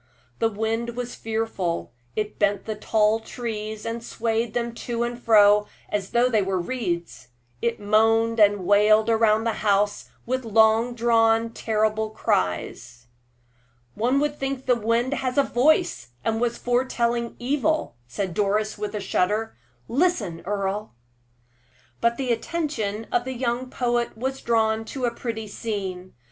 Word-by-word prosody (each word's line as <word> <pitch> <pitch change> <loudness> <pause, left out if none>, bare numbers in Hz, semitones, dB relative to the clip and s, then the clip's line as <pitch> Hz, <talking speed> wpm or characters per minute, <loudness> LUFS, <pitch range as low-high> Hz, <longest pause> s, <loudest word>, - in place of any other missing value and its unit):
The 225 - +3
wind 225 +2 -2
was 245 0 -4
fearful; 220 -6 -3 0.2
it 210 -1 -3
bent 205 -1 +1
the 220 - -2
tall 215 +1 +2
trees, 220 -2 -5
and 230 0 -4
swayed 225 -1 -2
them 235 -1 -1
to 235 0 -3
and 240 0 -4
fro 210 -2 +5 0.2
as 200 -2 -2
though 240 +1 +3
they 220 -4 +2
were 190 -1 -1
reeds. 175 - -3 0.3
It 235 -1 -1
moaned 225 +2 +3
and 205 -3 +4
wailed 210 +3 +5
round 220 -1 +3
the 230 - +1
house 205 0 +1 0.2
with 255 +2 -1
long 225 +2 +3
drawn, 225 -1 +3
terrible 220 -1 0
cries. 120 - -2 0.9
"One 250 +5 +1
would 295 0 -1
think 270 -1 -3
the 255 - +4
wind 235 +3 0
had 255 -2 -2
a 280 - +6
voice, 245 - +2 0.2
and 225 0 0
was 235 -1 0
foretelling 240 -1 0
evil," 290 +5 0
said 185 +8 -3
Doris, 210 +2 0
with 210 0 -4
a - - -1
shudder. 205 +3 0 0.3
"Listen, 235 - 0
Earle!" 200 - -2 1.0
But 235 0 +1
the 260 -3 -1
attention 230 -6 -2
of 240 - +2
the 260 +1 -5
young 245 +1 -2
poet 240 -3 -1
was 265 +3 -3
drawn 225 -1 +1
to 255 +2 -3
a 235 - -1
pretty 225 -2 -5
scene. 195 -4 -5
225 Hz, 145 wpm, -24 LUFS, 210-240 Hz, 1.0 s, a